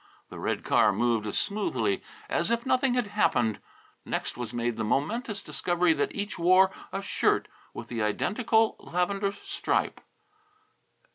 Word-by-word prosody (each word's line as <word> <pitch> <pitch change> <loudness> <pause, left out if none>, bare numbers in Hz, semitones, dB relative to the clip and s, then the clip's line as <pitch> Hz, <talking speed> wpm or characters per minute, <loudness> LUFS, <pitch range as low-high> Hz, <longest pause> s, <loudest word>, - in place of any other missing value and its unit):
The - - -9
red - - -2
car 105 - +4
moved 115 +1 +1
as 105 - -2
smoothly 125 - 0 0.3
as 170 +4 0
if 235 0 0
nothing 255 -1 +2
had 245 -2 +1
happened. 120 - +1 0.4
Next - - -3
was 120 -3 -5
made 120 -1 -1
the 110 - -2
momentous 205 - -1
discovery 175 -1 +1
that - - -1
each 200 -2 -4
wore 185 +2 +5 0.2
a 195 - -3
shirt - - +1 0.2
with - - -8
the 115 -2 -3
identical 220 - +1
lavender 195 +3 -1
stripe. 200 - -2
180 Hz, 145 wpm, -28 LUFS, -, 0.4 s, wore